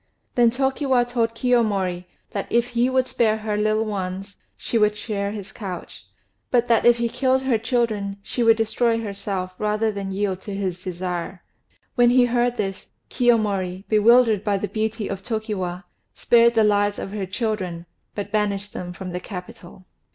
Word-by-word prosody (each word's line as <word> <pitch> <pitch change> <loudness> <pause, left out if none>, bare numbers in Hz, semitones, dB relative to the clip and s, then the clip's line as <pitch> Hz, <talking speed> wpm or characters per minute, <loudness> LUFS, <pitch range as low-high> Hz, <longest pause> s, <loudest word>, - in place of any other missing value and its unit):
Then 240 -1 +5
Tokiwa 265 0 +1
told 230 -2 0
Kiyomori 205 -8 +1 0.3
that 200 - -4
if 235 +1 +2
he 240 +2 +1
would 260 0 +1
spare 220 -3 +1
her 215 -1 -3
little 215 +1 +1
ones 195 -1 -4 0.2
she 230 - 0
would 210 0 +2
share 200 -2 -3
his 200 -1 -7
couch; 190 -6 -8 0.4
but 245 -1 +2
that 230 0 +4
if 240 0 +6
he 235 0 0
killed 260 +2 +1
her 250 -4 +2
children 220 -4 -1
she 245 - -2
would 225 -1 +5
destroy 225 +1 +1
herself 200 -3 -4
rather 215 +1 +1
than 200 -1 -5
yield 190 -1 -2
to 200 0 -6
his 185 -2 -3
desire. 180 0 -4 0.5
When 245 -2 +5
he 250 0 +5
heard 245 0 +1
this, 195 -3 -3 0.2
Kiyomori, 200 -6 +1
bewildered 220 -1 +5
by 205 -2 +1
the 205 - -3
beauty 220 +1 -2
of 195 -1 -4
Tokiwa, 195 -5 -3 0.3
spared 235 0 +4
the 220 - +5
lives 205 -1 +2
of 195 - -5
her 200 -2 -4
children, 190 -5 -3 0.3
but 205 - -5
banished 205 -1 -1
them 180 0 -6
from 185 0 -7
the 180 - -3
capital. 180 -1 -10
210 Hz, 170 wpm, -23 LUFS, 195-235 Hz, 0.5 s, if